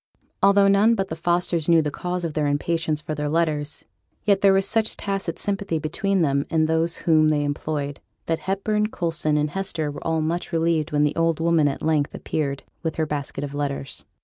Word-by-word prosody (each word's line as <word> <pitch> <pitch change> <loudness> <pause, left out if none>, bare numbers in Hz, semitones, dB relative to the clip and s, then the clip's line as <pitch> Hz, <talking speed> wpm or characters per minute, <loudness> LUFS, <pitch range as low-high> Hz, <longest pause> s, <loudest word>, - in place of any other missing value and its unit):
Although 200 0 +5
none 210 +4 +5
but 195 -2 -2
the 160 - -3
Fosters 170 -1 0
knew 165 -2 +5
the 150 - -2
cause 180 +2 -3
of 160 - -3
their 150 -1 0
impatience 155 +1 -1
for 155 - -4
their 150 0 -2
letters, 155 -2 -1 0.4
yet 200 -2 +3
there 195 - +6
was 195 0 +3
such 220 +1 +1
tacit 195 -4 -3
sympathy 200 -4 -1
between 185 +5 0
them 140 -2 +1
and 160 -1 +2
those 160 +1 +1
whom 155 -2 +5
they 150 -1 +2
employed, 145 0 -3 0.3
that 165 -1 -1
Hepburn, 210 +2 0
Coulson, 165 -5 0
and 150 0 0
Hester 170 -5 -2
were 145 - -8
all 160 -1 0
much 170 +3 -2
relieved 165 -1 +1
when 150 0 +2
the 150 - +1
old 165 -1 +1
woman 165 -2 +3
at 140 - -3
length 155 -2 +1
appeared 140 -3 -3 0.2
with 160 -1 -3
her 160 - 0
basket 145 -2 -4
of 145 -1 -5
letters. 140 -2 -4
160 Hz, 200 wpm, -23 LUFS, 150-180 Hz, 0.4 s, there